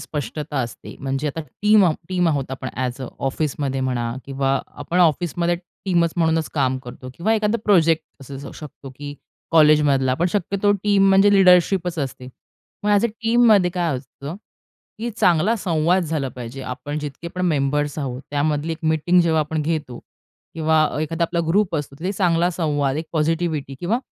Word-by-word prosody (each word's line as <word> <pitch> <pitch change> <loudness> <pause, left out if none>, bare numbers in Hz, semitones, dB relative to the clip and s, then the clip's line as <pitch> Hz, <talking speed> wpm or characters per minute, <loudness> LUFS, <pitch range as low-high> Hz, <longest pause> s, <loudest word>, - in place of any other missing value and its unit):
स्पष्टता 150 0 -5
असते. 120 -2 -7
म्हणजे 135 +2 -2
आता 150 +3 -3 0.2
टीम 210 -1 +6
आहो 165 -3 +3
टीम 180 -2 +1
आहोत 140 -4 -1
आपण, 130 0 -5
ॲज 125 0 -3
अ - - -4 0.2
ऑफिसमध्ये 135 -1 -2
म्हणा, 120 -3 -1
किंवा 135 0 0 0.2
आपण 175 - -2
ऑफिसमध्ये 175 +1 +2 0.3
टीमच 170 -4 +2
म्हणूनच 160 -2 +1
काम 130 -3 +1
करतो, 125 +1 -9
किंवा 195 +9 0
एखादा 215 +1 +1
प्रोजेक्ट 165 -5 +3 0.2
असू 135 +1 -9
शकतो, 145 -3 -10
की 145 +2 -8 0.4
कॉलेजमधला, 150 -5 +4
पण 175 +7 +1
शक्यतो 200 +1 +1
टीम 200 -1 +2
म्हणजे 195 +1 +5
लीडरशिपच 180 -2 +4
असते. 130 -3 -4 0.5
मग 210 - +1
ॲज 205 +2 +4
अ 235 - +3
टीममध्ये 225 -4 +3
काय 170 -5 -1
असतं? 140 +4 -9 0.6
की 235 +2 -3
चांगला 190 -1 +2
संवाद 175 -2 +1
झाला 155 -4 -2
पाहिजे. 125 +1 -8
आपण 145 +4 -5
जितके 150 +3 -6
पण 180 +2 -3
मेंबर्स 145 -1 0
आहोत, 130 -3 -4
त्यामधली 150 +2 0
एक 160 - -6
मीटिंग 160 +3 +3
जेव्हा 160 -2 +2
आपण 155 +1 -2
घेतो 150 -6 -3 0.6
किंवा 160 -1 +2
अ, 150 - -2
एखादा 165 +2 -1
आपला 170 +1 -1
ग्रुप 185 0 +2
असतो, 145 -2 -5
तर 180 +3 -2
चांगला 175 -3 +2
संवाद, 145 -5 -1
एक 160 - -3
पॉझिटिव्हिटी 160 -3 -1
किंवा 205 +7 0
160 Hz, 165 wpm, -21 LUFS, 140-180 Hz, 0.6 s, टीम